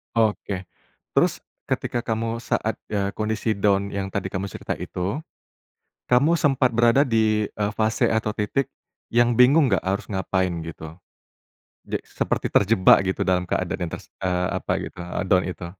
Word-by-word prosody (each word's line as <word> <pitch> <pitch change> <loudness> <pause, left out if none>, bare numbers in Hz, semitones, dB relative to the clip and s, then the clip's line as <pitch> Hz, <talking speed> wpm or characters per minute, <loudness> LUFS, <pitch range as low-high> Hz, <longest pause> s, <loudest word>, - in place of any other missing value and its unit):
Oke. 105 -4 0 0.5
Terus, - - +3 0.2
ketika 120 -1 -2
kamu 115 +1 -2
saat, 110 0 -1 0.2
eee, 100 -1 -1
kondisi 110 0 -1
down 100 0 +2
yang 95 -1 -3
tadi 95 -1 -2
kamu 95 +1 -3
cerita - - -4
itu, 100 - -4 0.9
kamu 140 +7 +4
sempat 135 -6 +2
berada 120 +4 +4
di, 110 -3 +2
eee, 105 0 -3
fase 110 0 +2
atau 110 -1 0
titik 110 +6 -1 0.5
yang 120 0 +3
bingung 135 +3 +6
nggak 95 -5 0
harus 95 +2 -1
ngapain 95 -2 0
gitu? 80 0 -9 0.9
Je - - -3
seperti - - -2
terjebak 100 -2 +5
gitu 95 +1 -1
dalam 90 -1 +1
keadaan 90 - -2
yang 80 - -8
ters - - -11
eee, 90 -1 0
apa - - -3
gitu, - - -9
eee, 90 0 -4
down 95 -2 +4
itu? 90 -1 -5
105 Hz, 155 wpm, -24 LUFS, 95-115 Hz, 0.9 s, bingung